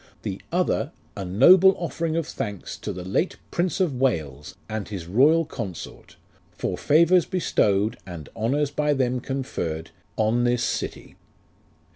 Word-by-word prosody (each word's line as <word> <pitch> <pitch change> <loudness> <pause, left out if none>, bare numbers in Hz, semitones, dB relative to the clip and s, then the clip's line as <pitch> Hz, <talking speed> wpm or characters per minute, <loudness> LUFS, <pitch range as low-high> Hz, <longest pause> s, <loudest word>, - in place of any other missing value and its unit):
The - - -4
Other, - - 0 0.2
A 100 - -4
noble 175 - +6
offering 165 -2 -2
of 165 - 0
thanks 105 - -5
To - - -5
the 90 - -6
late 100 - -1
Prince 175 +1 0
of 180 -7 +2
WALES, 80 - -1
and 110 -2 -4
his 95 -5 -6
royal 145 - +4
Consort, 105 - -7 0.3
For - - -3
favours 170 +4 +4
bestowed, 110 - +1
And 85 -5 -8
honours 135 +6 0
by 150 0 +1
them 125 -1 0
conferred, 85 - -4 0.3
on 110 +3 +2
this 120 0 +1
city. - - -4
125 Hz, 140 wpm, -24 LUFS, 100-155 Hz, 0.3 s, noble